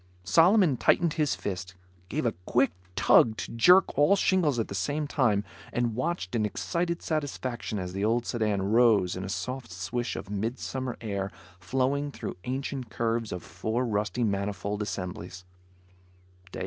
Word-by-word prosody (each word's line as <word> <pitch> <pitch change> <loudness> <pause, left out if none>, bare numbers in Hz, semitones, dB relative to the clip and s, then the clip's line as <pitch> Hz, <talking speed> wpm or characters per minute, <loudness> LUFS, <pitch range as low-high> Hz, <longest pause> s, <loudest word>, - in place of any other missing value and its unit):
Solomon 165 - +5
tightened 170 +5 +3
his 155 -4 +1
fist, 95 -1 -5 0.3
gave 150 +3 -2
a 120 - +3 0.2
quick 130 +3 +3 0.2
tug 110 +4 +5
to - - -5
jerk 180 +12 +5
all 150 +7 +6
shingles 180 -8 +2
at 115 - 0
the - - -7
same 145 +11 -1
time, 125 -8 +2 0.3
and 120 -2 0
watched 130 +9 -2
in 115 -3 +1
excited 170 - -2
satisfaction 130 -8 -3
as 90 -2 -4
the 100 +1 -2
old 115 +2 +1
sedan 105 -4 0
rose 105 -3 +4
in 95 - -4
a 95 - -5
soft 125 +2 -4
swish 95 +7 -3
of - - -6
midsummer 120 +5 -3
air 100 -3 -3 0.3
flowing 135 +9 0
through - - -6
ancient 130 -1 -3
curves 115 -1 -1
of 90 -2 -5
four 110 +8 -2
rusty 105 +1 -1
manifold 100 0 -2
assemblies. 90 -3 -5
115 Hz, 150 wpm, -28 LUFS, 100-135 Hz, 0.3 s, all